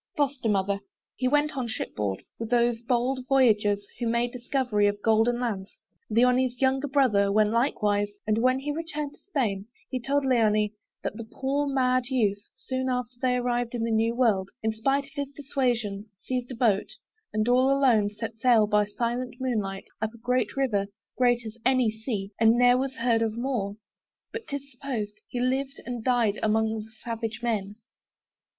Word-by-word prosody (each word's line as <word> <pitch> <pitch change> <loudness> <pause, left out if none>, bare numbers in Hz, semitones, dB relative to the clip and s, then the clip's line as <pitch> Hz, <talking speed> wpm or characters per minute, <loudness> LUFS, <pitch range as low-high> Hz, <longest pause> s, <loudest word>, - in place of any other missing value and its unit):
FOSTER 275 -5 0
MOTHER. 200 0 +1 0.4
He 255 - 0
went 295 +2 +2
on 255 -3 -2
ship 220 - -4
board 100 -2 -2 0.2
With 225 -1 -4
those 240 -1 +2
bold 250 +2 0
voyagers, 210 -6 +3
who 240 - -1
made 235 +1 +1
discovery 245 -4 0
Of 205 0 -2
golden 225 +2 +3
lands. 205 -6 -3 0.3
Leoni's 250 +2 +3
younger 270 +1 +2
brother 245 -8 +3
Went 210 +1 +3
likewise, 210 -4 +1
and 215 +1 +1
when 255 +2 +3
he 280 +2 -3
returned 300 -2 -4
to - - -20
Spain, 220 - -2 0.2
He 255 - -1
told 275 +3 0
Leoni, 215 -4 +3 0.3
that 210 - -3
the 230 - -5
poor 280 +2 -1
mad 255 -2 +1
youth, 215 -6 +1 0.2
Soon 260 0 -3
after 250 -1 -2
they 255 -1 +2
arrived 245 -1 -1
in 230 - -1
that 230 - 0
new 225 +1 +2
world, 210 -6 +2
In 220 - +2
spite 270 +6 +1
of 275 - -17
his 280 -1 -3
dissuasion, 245 -8 -2
seized 250 +3 -3
a - - -5
boat, 225 -5 +1 0.4
And 215 +1 0
all 255 +2 +4
alone, 255 -7 +4
set 220 +2 -6
sail 235 -3 +5
by 210 0 +3
silent 240 +3 -2
moonlight 210 -7 -2 0.2
Up 220 +1 -2
a - - -12
great 245 0 -1
river, 210 -8 +1 0.3
great 245 -1 +2
as 220 +1 -8
any 255 -3 +3
sea, 215 -3 -4
And 225 +1 +5
ne'er 245 0 +6
was 265 +1 -1
heard 230 -1 +2
of 225 0 -1
more: 235 -6 -2 0.6
but 455 0 -6
'tis 280 -1 -5
supposed, 235 -5 -5
He 245 - -4
lived 265 +2 -1
and 240 -2 -5
died 235 -5 +2
among 220 0 +1
the - - -17
savage 225 -1 -4
men. 210 -4 -1
240 Hz, 180 wpm, -27 LUFS, 215-260 Hz, 0.6 s, ne'er